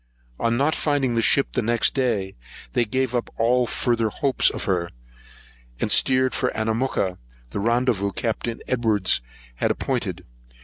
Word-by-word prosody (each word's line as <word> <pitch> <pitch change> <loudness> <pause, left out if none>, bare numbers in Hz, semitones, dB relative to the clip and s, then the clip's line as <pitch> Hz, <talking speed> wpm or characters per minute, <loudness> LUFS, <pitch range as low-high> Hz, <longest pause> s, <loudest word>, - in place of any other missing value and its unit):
On 115 0 +1
not 145 +4 +2
finding 140 -5 +1
the 115 - +2
ship 140 +4 +3
next 120 -1 +2
day, 115 -8 -1 0.4
they 120 - +2
gave 130 +3 -1
up 120 -1 -1
all 120 +2 +2
further 115 -2 0
hopes 135 +5 +2
of - - -5
her, 90 -4 0 0.9
and - - -1
steered 130 0 +3
for 125 - 0
Anamooka, 110 -4 -1 0.3
the - - -3
rendezvous 115 -2 +1
Captain 115 +2 -3
Edwards 110 - +2 0.4
had - - +1
appointed. - - -2
120 Hz, 140 wpm, -23 LUFS, 110-130 Hz, 0.9 s, ship